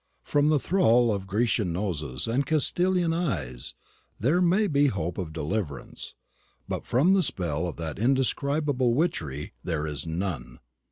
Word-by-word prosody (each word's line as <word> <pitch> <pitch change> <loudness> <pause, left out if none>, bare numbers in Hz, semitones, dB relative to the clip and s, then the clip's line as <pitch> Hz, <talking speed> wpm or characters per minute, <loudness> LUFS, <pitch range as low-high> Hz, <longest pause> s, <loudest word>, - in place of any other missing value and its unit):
From 145 +1 +2
the 155 - +4
thrall 125 - +3
of 95 -1 -4
Grecian 105 -2 +1
noses 80 -8 -2
and 125 +5 +1
Castilian 175 +4 +2
eyes 80 - -2 0.4
there 150 - +2
may 185 +4 +3
be 145 -6 +3
hope 90 - -2
of 85 -4 -4
deliverance, 80 - -4 0.5
but - - -4
from 145 +11 +4
the 195 - +4
spell 90 - -1
of 85 - -5
that 80 -1 -5
indescribable 135 +1 +1
witchery 80 - -2
there 80 -3 -1
is 75 0 -4
none. 80 -8 -3
110 Hz, 145 wpm, -27 LUFS, -, 0.5 s, the